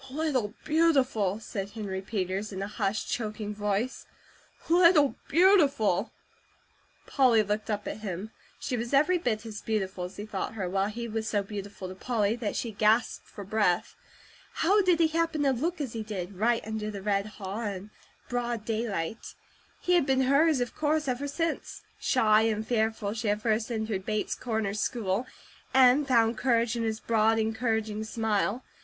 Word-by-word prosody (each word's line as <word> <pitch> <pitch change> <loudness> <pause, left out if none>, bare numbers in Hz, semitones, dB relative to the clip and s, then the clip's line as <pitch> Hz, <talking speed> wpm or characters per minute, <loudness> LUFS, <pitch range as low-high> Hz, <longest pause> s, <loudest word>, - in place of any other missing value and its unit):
"Little 260 -7 -1
Beautiful!" 270 - +2
said 200 -3 -5
Henry 200 -3 -5
Peters 195 0 -3
in 190 0 -4
a - - -3
hushed, 210 0 -2
choking 215 -2 -3
voice, 210 +4 -2 0.6
"Little 335 -4 +5
Beautiful!" 280 - +4 0.9
Polly 245 -6 +4
looked 210 +2 -2
up 205 -1 -2
at - - -5
him. 205 0 -5 0.3
She 250 - -2
was 235 +3 -1
every 345 +6 +4
bit 230 -8 -1
as 215 -2 -7
beautiful 190 -4 -2
as 180 - -9
he 205 - -5
thought 210 0 -4
her, 195 -4 -2
while 195 +2 0
he 235 +2 -5
was 220 0 -3
so 205 -2 +1
beautiful 200 -1 -7
to 185 - -7
Polly 215 +1 0
that 225 -4 -3
she 235 - -2
gasped 215 +3 +1
for 205 - -9
breath. 200 -3 +1 0.6
How 400 +5 +3
did 360 -3 +3
he 325 -1 +4
happen 330 -2 0
to 275 - +3
look 320 +8 -2
as 270 -6 -3
he 225 - -3
did, 200 -3 -5
right 230 +4 +1
under 220 -1 -3
the 200 -2 -7
red 200 0 0
haw, 200 +2 -5
in 205 -1 -5 0.4
broad 240 -3 -2
daylight? 220 -4 -3 0.5
He 360 - +1
had 345 -6 +3
been 265 -1 +3
hers, 280 +3 +4
of 245 -1 -2
course, 305 0 0
ever 255 +2 -1
since, 330 +3 -3 0.2
shy 215 -4 +4
and 220 -1 0
fearful, 220 -3 0
she 225 0 -3
had 210 +1 0
first 220 +1 0
entered 220 -4 -3
Bates 215 -1 -1
Corners 220 -4 -2
school, 220 0 -1 0.5
and 265 +2 +6
found 230 -3 +3
courage 235 -2 +2
in 235 - -2
his 220 -1 -1
broad, 225 -1 +2
encouraging 220 -1 -1
smile. 220 +1 -1
220 Hz, 170 wpm, -28 LUFS, 205-255 Hz, 0.9 s, and